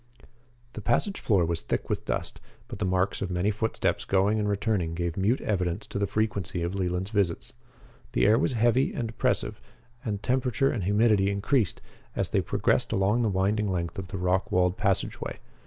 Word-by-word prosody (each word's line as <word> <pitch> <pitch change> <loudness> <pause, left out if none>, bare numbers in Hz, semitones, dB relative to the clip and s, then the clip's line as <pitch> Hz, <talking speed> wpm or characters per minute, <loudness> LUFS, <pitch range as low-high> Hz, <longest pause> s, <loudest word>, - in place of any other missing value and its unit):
The 110 - -6
passage 155 - +1
floor 95 -6 +2
was 85 0 -1
thick - - -2
with - - -2
dust, - - -3 0.3
but - - -8
the 105 - 0
marks 95 +1 0
of 95 - -2
many 90 +3 +1
footsteps 110 +2 -1
going 100 +3 +2
and 105 -1 0
returning 100 -5 0
gave 85 -1 -2
mute 105 +7 +2
evidence 90 -1 -1
of 100 - -2
the 100 - +2
frequency 100 -5 -1
of 85 +2 -2
Leland's 95 0 -2
visits. 100 -6 0 0.6
The - - +3
air 110 +3 +5
was 140 - +1
heavy 120 +3 +2
and 115 -2 -2
oppressive 115 - -1 0.4
and 105 -3 -2
the - - -15
temperature 130 +2 +1
and 100 -7 -2
humidity 105 -1 +3
increased 100 - 0 0.3
as - - 0
they - - +2
progressed - - +1
along 100 +5 +2
the 115 - +2
winding 100 +3 +1
length 85 +2 -2
of 95 - -6
the 95 +1 -5
rock 90 +1 0
walled 90 0 +2
passageway. 100 -3 -1
100 Hz, 190 wpm, -27 LUFS, 90-110 Hz, 0.6 s, air